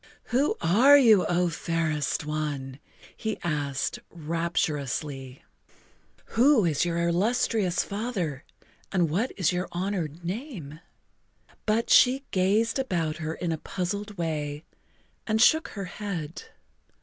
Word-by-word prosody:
"Who 270 +4 +2
are 240 +13 +6
you, 220 -9 +5
O 175 0 +2
fairest 165 -3 -1
one?" 145 -3 -3 0.4
he 220 -1 -3
asked 145 -4 -2
rapturously. 150 -5 -3 0.9
"Who 240 -2 +5
is 155 -4 +1
your 170 -1 -1
illustrious 190 0 +1
father 200 - -3 0.5
and 175 -5 +1
what 215 +10 0
is 185 -3 +2
your 180 +1 -2
honored 175 -3 -3
name?" 180 - -6 0.9
But 220 +2 +1
she 265 +2 +6
gazed 205 +7 +2
about 170 -11 -1
her 160 -1 -4
in 175 -2 -3
a 160 - -2
puzzled 200 +4 -4
way 150 -2 -3 0.6
and 220 0 +1
shook 315 +7 +5
her 200 -2 -6
head. 180 -6 -6
175 Hz, 115 wpm, -27 LUFS, 155-215 Hz, 0.9 s, are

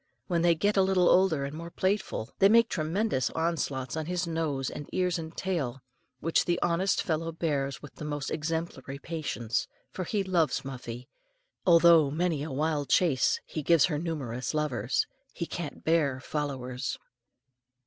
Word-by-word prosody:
When 170 -3 0
they 170 -1 +4
get 205 +5 +1
a - - +6
little 190 -2 +3
older 175 -7 +4
and 140 +2 -6
more 170 +1 -6
playful, 185 - -1
they 195 - +7
make 230 +1 +5
tremendous 160 - 0
onslaughts 145 -6 -1
on 160 -1 -3
his 180 0 -1
nose 160 -5 -1
and 145 - -7
ears 180 -2 0
and 160 0 -8
tail, 140 -10 -2 0.4
which 165 - +2
the 175 0 +1
honest 175 +3 +1
fellow 165 0 -1
bears 145 -5 -2
with 145 - -10
the - - -9
most 145 -2 -3
exemplary 155 -3 -3
patience, 140 -8 -3 0.2
for 185 - -4
he 205 +3 0
loves 175 -7 +1
Muffie, 125 -2 -7 0.6
although 170 -3 +7
many 160 0 0
a 155 - -4
wild 145 +1 -1
chase 150 -9 +3
he 155 - -4
gives 165 0 +5
her 150 -4 -1
numerous 135 -6 -3
lovers. 130 -7 0 0.3
He 170 - -2
can't 165 -3 -6
bear 150 -5 +2
"followers." 130 -3 -3
160 Hz, 160 wpm, -29 LUFS, 140-170 Hz, 0.6 s, they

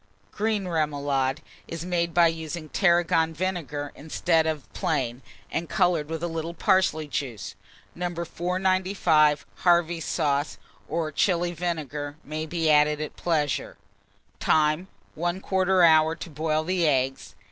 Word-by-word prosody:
GREEN 210 -3 -1
REMOULADE 145 -3 0 0.3
is 165 0 -6
made 170 -1 0
by 170 +1 +5
using 160 -1 -3
tarragon 170 -3 +2
vinegar 150 -5 -3
instead 160 +1 0
of 155 -3 -3
plain, 135 -9 -1 0.3
and 165 0 -3
colouring 175 -5 +2
with 160 +1 -5
a - - 0
little 165 0 -4
parsley 185 -5 +2
juice, 120 -8 -4 0.4
No. 180 +1 -3
495. 180 -3 +1
Harvey's 170 -2 +2
sauce, 145 0 0 0.3
or 160 0 -1
Chili 175 +1 +1
vinegar, 150 -4 -4
may 155 +2 -5
be 165 0 -1
added 150 0 +4
at 155 -1 -5
pleasure. 150 -5 -1 0.6
Time. 155 +3 +2 0.3
1/4 185 +1 +2
hour 160 0 +4
to 165 +1 -9
boil 155 +1 0
the 175 -1 +1
eggs. 135 -2 -1
160 Hz, 125 wpm, -26 LUFS, 150-175 Hz, 0.6 s, by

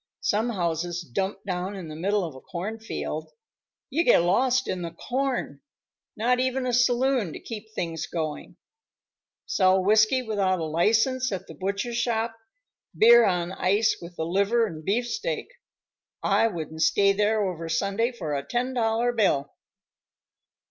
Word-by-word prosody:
Some 220 +4 +1
houses 175 -3 -2
dumped 190 - -3
down 185 +1 -3
in 185 -4 -7
the 155 - -8
middle 200 +5 0
of 160 - -7
a 130 - -12
cornfield. 190 - -5 0.6
You 320 +6 +2
get 170 - +5
lost 255 +8 +2
in 185 - -2
the 170 - -3
corn. 260 +5 -2 0.6
Not 245 +3 +2
even 260 0 0
a 250 - -1
saloon 245 - +2
to - - -7
keep 220 -1 -8
things 165 -2 -3
going; 155 -3 -5 0.9
sell 185 -1 +3
whiskey 215 +5 +4
without 200 -5 0
a 165 - -3
license 225 - +2
at 190 -3 -4
the - - -11
butcher 200 +8 -3
shop, 230 -1 -1 0.6
beer 235 +1 +8
on 175 -2 0
ice 200 +4 +1
with 170 0 -10
the 160 - -3
liver 200 +7 +2
and 160 -7 -7
beefsteak. 245 - -2 0.7
I 225 - +3
wouldn't 160 -5 -5
stay 200 +4 +4
there 210 +1 +1
over 170 -4 -4
Sunday 200 +8 0
for 170 -11 -5
a 140 - -1
ten 245 - -2
dollar 230 0 +1
bill." 190 -12 +1
205 Hz, 150 wpm, -26 LUFS, 175-235 Hz, 0.9 s, beer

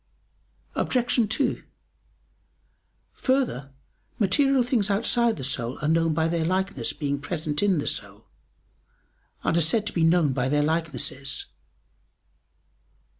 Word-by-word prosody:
Obj. 240 -3 +1
2: 255 +3 0 1.5
Further, 255 - 0 0.5
material 265 +6 +3
things 235 -5 0
outside 230 +2 +2
the 135 - -6
soul 125 -2 -1
are - - +1
known 165 0 +2
by 160 0 +2
their 165 0 0
likeness 185 -7 -1
being 140 -2 -3
present 150 0 -3
in 200 -3 +3
the 145 - -2
soul, - - -3 1.2
and - - +1
are 170 - +3
said 165 +7 +2
therefore - - -17
to 210 - -4
be 170 - +1
known 165 -4 +3
by 130 0 -1
their 145 +1 +2
likenesses. 145 -4 -2
165 Hz, 125 wpm, -25 LUFS, 145-210 Hz, 1.5 s, material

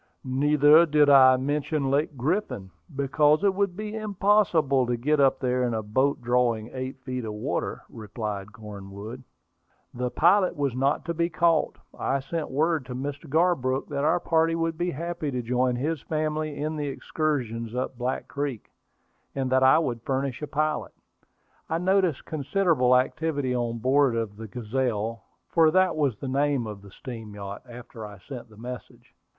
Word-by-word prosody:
"Neither 145 +4 +5
did 150 -1 +4
I 130 -2 +8
mention 145 +1 -1
Lake 145 +1 0
Griffin, 130 - -2 0.2
because 150 +4 +3
it 200 -1 +4
would 195 -2 -1
be 215 0 -5
impossible 195 - +2
to 120 0 0
get 150 +5 +1
up 135 -1 +4
there 125 -1 0
in 120 -2 0
a 110 - -2
boat 130 +5 0
drawing 120 -2 +1
eight 130 +1 -5
feet 125 -1 -4
of 110 -1 -5
water," 105 - -3
replied 105 -2 -6
Cornwood. 105 +1 -9 0.7
The 125 +1 -2
pilot 185 +7 +3
was 140 -3 -1
not 135 +4 +1
to 170 - -2
be 170 +1 0
caught. 165 -1 +2 0.2
I 135 - -1
sent 155 +4 -4
word 155 +2 +1
to 125 - -6
Mr. 140 +3 -5
Garbrook 140 -5 +1
that 140 -1 -2
our 160 +3 +3
party 165 -1 +2
would 165 0 -1
be 175 +2 -1
happy 170 0 -4
to 125 -2 -3
join 125 +1 +1
his 150 +4 -2
family 155 -1 -2
in 155 +1 -3
the 145 -1 -2
excursion 130 -6 -2
up 130 0 -2
Black 125 +2 -3
Creek, 140 -5 -4 0.6
and 135 -2 -1
that 130 0 +4
I 130 +2 +6
would 125 -8 -1
furnish 135 +1 -2
a 150 - -3
pilot. 155 +1 -1 0.8
I 160 - 0
noticed 185 -3 +1
considerable 145 -4 +2
activity 140 0 -1
on 120 -1 -1
board 130 +1 +3
of 110 -3 -2
the 110 0 -7
Gazelle, 115 -1 -2 0.2
for 165 -2 +4
that 185 +1 +3
was 140 -8 0
the 135 - -6
name 140 -1 +1
of 105 -2 -7
the 100 - -13
steam 115 -1 -9
yacht, 100 0 -7
after 120 -1 -10
I 105 -1 -9
sent 120 +3 -9
the 110 - -17
message. 125 +2 -9
135 Hz, 170 wpm, -26 LUFS, 120-155 Hz, 0.8 s, I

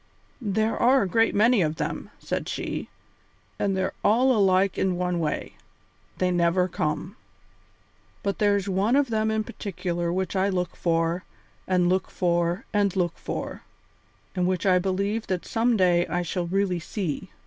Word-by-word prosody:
"There 220 0 0
are 255 0 +4
a - - -1
great 225 +4 +2
many 225 +1 +4
of 155 -2 0
them," - - -4
said - - -4
she, - - -4 0.7
"and 195 -2 0
they're 190 0 -1
all 250 +5 +4
alike 195 -2 +3
in 185 -2 0
one 180 -1 -1
way 155 -2 -2 0.6
they 185 0 +1
never 175 +1 +2
come. 165 +3 -3 1.1
But 200 -1 -2
there's 205 -1 +2
one 200 +6 +2
of 280 -4 +2
them 220 0 +1
in 220 0 0
particular 175 -4 -3
which 185 +1 -2
I 190 +1 +2
look 180 -2 -2
for 165 +1 0 0.4
and 180 -1 +2
look 185 +1 +1
for 175 0 0
and 200 -2 +2
look 175 -3 -1
for, - - -5 0.7
and 180 -1 +1
which 185 0 -1
I 185 -2 +5
believe 200 +4 -1
that 185 -2 -2
some 230 0 +1
day 175 -2 +3
I 175 0 -1
shall 175 +1 -2
really 190 -1 0
see. 180 0 -4
185 Hz, 160 wpm, -25 LUFS, 175-205 Hz, 1.1 s, I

